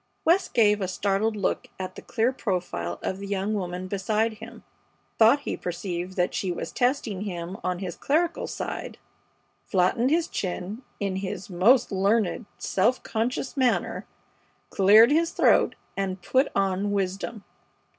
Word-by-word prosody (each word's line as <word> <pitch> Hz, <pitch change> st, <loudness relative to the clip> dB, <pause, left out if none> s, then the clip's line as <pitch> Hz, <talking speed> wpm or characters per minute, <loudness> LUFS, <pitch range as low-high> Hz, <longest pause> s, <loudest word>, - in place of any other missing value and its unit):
West 355 Hz, +4 st, +2 dB
gave 210 Hz, -3 st, +4 dB
a 190 Hz, -, 0 dB
startled 200 Hz, +4 st, 0 dB
look 200 Hz, -, -1 dB
at 185 Hz, -1 st, -4 dB
the -, -, -10 dB
clear 235 Hz, +4 st, 0 dB
profile 175 Hz, -, -3 dB
of 190 Hz, -, -2 dB
the 200 Hz, -, -6 dB
young 200 Hz, +1 st, -1 dB
woman 180 Hz, -2 st, -3 dB
beside 215 Hz, +3 st, 0 dB
him, -, -, -11 dB, 0.6 s
thought 230 Hz, +6 st, +6 dB
he -, -, -3 dB
perceived 180 Hz, +1 st, -4 dB
that 180 Hz, -1 st, +1 dB
she 195 Hz, -3 st, -1 dB
was 175 Hz, -, -5 dB
testing 245 Hz, -6 st, 0 dB
him 180 Hz, -3 st, -5 dB
on 180 Hz, -1 st, -1 dB
his 180 Hz, -2 st, -5 dB
clerical 330 Hz, +4 st, 0 dB
side, -, -, -5 dB, 0.7 s
flattened 210 Hz, +7 st, +2 dB
his 330 Hz, +2 st, +2 dB
chin 190 Hz, +4 st, -4 dB, 0.2 s
in 195 Hz, -2 st, -1 dB
his 190 Hz, 0 st, -5 dB
most 220 Hz, +10 st, +4 dB
learned, 200 Hz, +2 st, +1 dB
self 225 Hz, +7 st, +1 dB
conscious 240 Hz, +5 st, -2 dB
manner, 260 Hz, -3 st, 0 dB, 0.6 s
cleared 215 Hz, +6 st, +7 dB
his 330 Hz, +2 st, +3 dB
throat, -, -, +4 dB, 0.2 s
and 190 Hz, -2 st, -3 dB
put 265 Hz, +7 st, +2 dB
on 195 Hz, +1 st, +1 dB
wisdom. 200 Hz, +2 st, -2 dB
200 Hz, 145 wpm, -26 LUFS, 185-230 Hz, 0.7 s, cleared